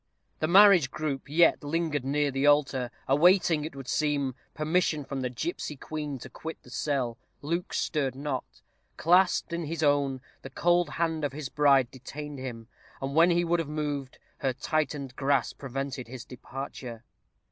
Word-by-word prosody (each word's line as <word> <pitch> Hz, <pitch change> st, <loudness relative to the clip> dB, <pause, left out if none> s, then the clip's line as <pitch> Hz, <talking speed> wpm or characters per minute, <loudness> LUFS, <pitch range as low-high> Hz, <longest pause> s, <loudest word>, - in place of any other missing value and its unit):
The 155 Hz, -, +1 dB
marriage 185 Hz, -5 st, +7 dB
group 140 Hz, -2 st, -4 dB
yet 165 Hz, +1 st, +4 dB
lingered 150 Hz, -2 st, -1 dB
near 145 Hz, +1 st, +1 dB
the 135 Hz, +2 st, +1 dB
altar, 140 Hz, -4 st, +3 dB, 0.2 s
awaiting, 165 Hz, +2 st, +4 dB
it 155 Hz, -, -7 dB
would 135 Hz, -2 st, -8 dB
seem, 145 Hz, -3 st, 0 dB, 0.2 s
permission 155 Hz, -1 st, +1 dB
from 135 Hz, -1 st, -4 dB
the 125 Hz, -, -1 dB
gipsy 150 Hz, +4 st, -4 dB
queen 150 Hz, 0 st, -5 dB
to 120 Hz, -, -9 dB
quit 160 Hz, 0 st, -7 dB
the -, -, -15 dB
cell. 130 Hz, -5 st, -1 dB, 0.2 s
Luke 170 Hz, +4 st, -2 dB
stirred 140 Hz, -5 st, -1 dB
not. 135 Hz, -2 st, -5 dB, 0.3 s
Clasped 180 Hz, 0 st, +3 dB
in 170 Hz, -1 st, -2 dB
his 160 Hz, +1 st, -3 dB
own, 140 Hz, -2 st, +2 dB, 0.2 s
the 135 Hz, -, -8 dB
cold 175 Hz, +5 st, +2 dB
hand 165 Hz, -2 st, -1 dB
of 145 Hz, -2 st, -1 dB
his 145 Hz, -2 st, -5 dB
bride 140 Hz, -4 st, +4 dB
detained 145 Hz, +2 st, -8 dB
him; 120 Hz, -3 st, -7 dB, 0.3 s
and 135 Hz, +1 st, -4 dB
when 165 Hz, +3 st, +6 dB
he 175 Hz, 0 st, +3 dB
would 170 Hz, +1 st, +2 dB
have 160 Hz, -3 st, -3 dB
moved, 145 Hz, -3 st, -3 dB, 0.2 s
her 135 Hz, -2 st, 0 dB
tightened 145 Hz, -2 st, -2 dB
grasp 140 Hz, -2 st, 0 dB
prevented 135 Hz, -1 st, -4 dB
his 125 Hz, -1 st, -8 dB
departure. 125 Hz, -2 st, -8 dB
Mrs. -, -, -47 dB
145 Hz, 170 wpm, -28 LUFS, 135-160 Hz, 0.3 s, marriage